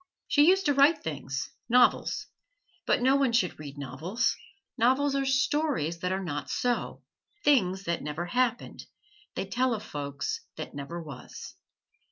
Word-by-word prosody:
She 295 +1 +5
used 385 +2 +4
to 290 - +3
write 285 +3 +4
things 135 -3 -4 0.2
novels; 245 +1 +3 0.6
but - - +2
no 265 +2 +5
one 270 -4 +2
should 210 -9 +1
read 145 -2 -8
novels; 150 - -1 0.4
novels 260 +4 +3
are 275 -1 0
stories 265 - +1
that 180 +1 -2
are 190 +1 -1
not 145 -5 -4
so 245 -1 -1 0.4
things 195 -10 +3
that 170 -2 -2
never 150 +4 -4
happened; 245 +5 -1 0.5
they - - -2
tell 250 -1 +1
of 210 - -7
folks 145 - -4
that - - -7
never 145 +4 -6
was. 145 -6 -9
225 Hz, 150 wpm, -28 LUFS, -, 0.6 s, She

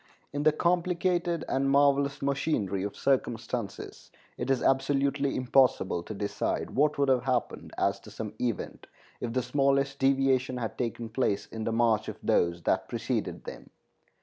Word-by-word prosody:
In 145 - -1
the 155 +1 +5
complicated 175 0 0
and 135 +1 +1
marvelous 140 0 +3
machinery 135 - 0
of 100 +1 -4
circumstances 120 -4 -2 0.3
it 120 - -4
is 135 -2 +1
absolutely 140 +1 +1
impossible 125 -8 +2
to 105 +5 -7
decide 100 0 -2
what 150 +2 +2
would 140 -1 +2
have 130 -2 +2
happened 125 -2 -1
as - - +1
to - - -13
some 105 -2 -6
event 120 -3 -3 0.3
if 120 - -3
the 130 0 0
smallest 140 0 +1
deviation 135 -1 +2
had 115 -3 -4
taken 120 -1 -3
place 110 -4 0
in 110 -1 -6
the - - 0
march 115 -1 +2
of - - -5
those 85 0 +1
that - - 0
preceded - - -3
them. - - -9
135 Hz, 155 wpm, -28 LUFS, 115-140 Hz, 0.3 s, the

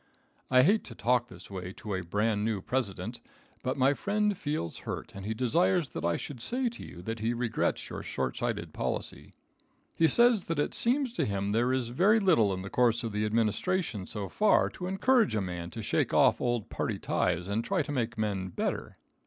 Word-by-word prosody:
I 130 0 +6
hate 205 +9 +4
to 115 - -8
talk 120 +2 +2
this 90 -1 -13
way 90 -1 -5
to 105 0 -6
a 95 - -1
bran 105 +4 0
new 110 -2 0
President, 115 -1 -3 0.4
but 130 +2 -2
my 135 +1 +4
friend 210 +5 0
feels 145 - -3
hurt - - -6
and 100 +1 -7
he 110 - -2
desires 165 +6 +2
that - - -6
I 85 0 +1
should 130 -5 -7
say 250 - 0
to 235 - -10
you 85 - -10
that 115 +3 -4
he 115 +2 0
regrets 120 -1 -1
your - - -6
short 65 -2 -3
sighted - - -3
policy. - - -4 0.7
He 165 - +6
says 235 - +4
that 165 - -2
it 145 - 0
seems 250 +1 +1
to - - 0
him 100 0 -1
there 120 +4 +2
is 130 -3 0
very 195 - +4
little 160 - +4
in 95 0 -3
the 100 - -6
course 120 -1 +2
of 115 - -3
the 105 +1 -1
administration 110 - 0
so 105 -2 -4
far 210 - +3
to 180 - -6
encourage 215 - +3
a - - +2
man 90 -2 -4
to 110 +4 -7
shake - - 0
off - - +4
old 120 -3 -1
party - - -2
ties 90 0 0
and 105 +3 -1
try 115 - 0
to 145 - -6
make 120 -4 -2
men 100 -3 -1
better. 90 - -3
115 Hz, 210 wpm, -29 LUFS, 100-165 Hz, 0.7 s, I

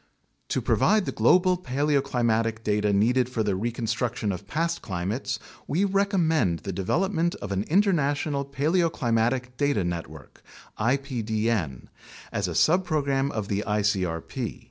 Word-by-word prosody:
To - - -1
provide 215 -2 +3
the - - -2
global 180 0 +3
paleoclimatic 125 -6 0
data 105 -1 +1
needed 120 +5 +2
for 115 -3 -1
the 100 -2 0
recon 115 +4 -3
struction 115 -1 -1
of 95 +1 -6
past 165 +7 -1
climates, 105 +7 -3 0.3
we 175 +8 +1
recommend 170 - +1
the 100 - -3
development 170 - 0
of 100 - -7
an 100 +2 -1
Inter 200 +5 +4
national 145 -2 0
Paleoclimatic 130 -5 0
Data 140 -8 +1
Network 80 -5 -6 0.4
(ipdn) 110 - -1 0.5
as - - -1
a - - -3
subprogram 150 -6 +2
of 110 -7 -3
the 100 +1 -1
icrp. 100 -6 -1
125 Hz, 130 wpm, -26 LUFS, 105-150 Hz, 0.5 s, Inter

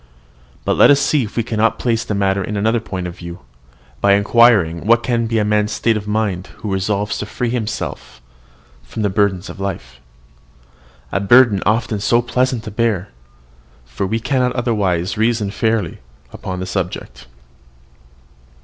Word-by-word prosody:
But - - +1
let - - +7
us 145 -1 +6
see 150 0 +2
if 105 - -11
we 115 - +2
cannot 115 0 +1
place 115 -2 0
the 105 - -3
matter 100 -1 +1
in 105 +3 -4
another 110 +3 +1
point 95 -5 -5
of 90 -1 -6
view, 85 0 -8 0.6
by 100 0 +5
inquiring 100 -5 +3
what 115 +1 +4
can 120 -2 0
be 115 0 0
a 105 - +2
man's 105 0 +1
state 115 -1 +1
of 105 -1 -4
mind 105 -4 -1
who 105 -3 -4
resolves 100 +2 -1
to 105 - -4
free 120 +2 -2
himself 120 -2 -4 0.6
from 65 - -6
the 100 - +1
burden 95 -2 +1
of - - -9
life, 75 -11 -5 1.1
a - - 0
burden 110 0 +5
often 110 -1 +1
so 120 +4 +3
pleasant 125 0 0
to 110 - -7
bear, 105 -3 0 0.8
for 65 +10 -4
we 110 +4 -1
cannot 125 +1 0
otherwise 105 -7 -1
reason 110 -3 +1
fairly 110 -5 -1 0.3
upon 90 -1 -5
the 95 - -3
subject. 90 -8 -5
105 Hz, 165 wpm, -18 LUFS, 95-115 Hz, 1.1 s, let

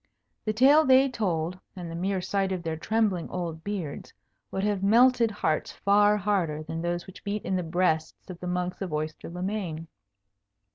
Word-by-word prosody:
The 215 - +1
tale 275 +7 +6
they 265 -1 +6
told, 180 -7 -2 0.2
and 175 -3 -6
the - - -5
mere 190 +2 -1
sight 195 +1 -1
of 185 -2 -3
their 160 -1 -2
trembling 200 0 0
old 165 -3 -4
beards, 190 -8 -5 0.4
would 190 - -3
have 205 -2 0
melted 235 +3 +5
hearts 160 -7 -1
far 205 +1 +4
harder 180 -7 0
than 165 +1 -5
those 175 0 -2
which 190 - -13
beat 205 +1 -3
in 190 - 0
the 185 - 0
breasts 160 -2 -1
of 180 -2 -8
the 180 - -6
monks 180 +1 -2
of 190 -3 -3
Oyster 155 +1 -4
le 180 +1 -5
Main. 185 -6 -3
185 Hz, 185 wpm, -27 LUFS, 165-205 Hz, 0.4 s, tale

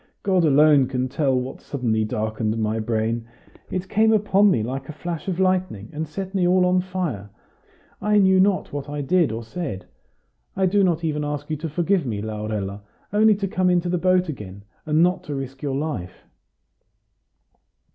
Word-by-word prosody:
God 185 -3 +2
alone 145 -2 +5
can 130 -1 -1
tell 135 -2 +1
what 125 +1 -6
so - - -23
suddenly 115 -5 +1
darkened 110 +1 -2
my 110 0 -1
brain. 115 +1 -1 0.4
It 185 +1 -3
came 220 +3 +3
upon 205 -1 +4
me 115 - +2
like 130 +5 -5
a - - -5
flash 170 +1 -5
of 185 -2 -2
lightning, 185 - 0
and 155 +1 -3
set 190 +5 -6
me 185 -3 +2
all 180 0 +4
on 180 0 +3
fire. 175 - -4 0.7
I 210 0 +2
knew 190 -2 +5
not 190 -4 +2
what 145 0 -5
I 145 0 -3
did 160 0 +2
or 115 +1 -4
said. 110 - -5 0.7
I 190 - +2
do 200 +2 +3
not 170 -3 +1
even 150 -2 -1
ask 145 +1 -4
you 155 - -1
to 160 +2 -4
forgive 175 0 0
me, 105 -4 -2
Laurella, 105 -2 -4 0.3
only 215 0 +5
to 200 0 -2
come 185 -1 +1
into 175 0 +1
the 180 0 0
boat 185 +1 +3
again, 100 -9 -7 0.2
and 155 +2 +4
not 180 +1 +1
to 145 - -4
risk 135 0 -6
your 140 -2 -2
life!" 135 - -4
155 Hz, 185 wpm, -23 LUFS, 115-185 Hz, 0.7 s, alone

